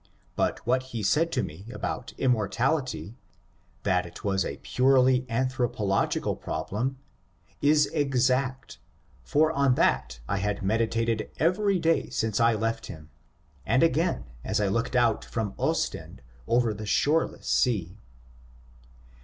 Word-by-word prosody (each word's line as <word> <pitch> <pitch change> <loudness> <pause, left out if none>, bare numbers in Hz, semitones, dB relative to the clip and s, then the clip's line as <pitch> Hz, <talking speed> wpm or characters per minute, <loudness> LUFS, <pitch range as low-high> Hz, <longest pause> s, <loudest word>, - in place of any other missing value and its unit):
But - - -1
what 130 +2 +2 0.2
he 110 - -3
said 155 - +2
to 125 - +1
me 95 +4 -8
about 125 - -5
inmiortality 120 - 0 0.3
— 95 +1 -37
that 90 -3 +2
it 85 - -11
was 95 -2 +1
a - - -5
purely 130 0 +3
an 125 +3 +1
thropological 110 -6 -1
problem 130 +6 -3 0.3
— 85 -2 -36
is 150 -1 +5
exact, 130 -1 0 0.4
for 155 - +2
on 140 -4 +2
that - - +1
I 100 - -1
had 100 0 -2
medi 110 +4 +2
tated 115 -1 -1
every 190 +6 +2
day 165 -1 +1
since 110 -4 -1
I 115 -1 +4
left 115 +1 -2
him, 80 -3 -11 0.5
and 130 - +2
again 165 - +1 0.2
as - - -1
I 105 -2 +1
looked 115 +5 -1
out 120 -3 +3
from 110 -3 -3
Ostend - - -2 0.2
over 120 -2 +2
the 105 +1 -7
shoreless 155 +8 +1
sea. 100 -6 +1
115 Hz, 140 wpm, -27 LUFS, 100-130 Hz, 0.5 s, is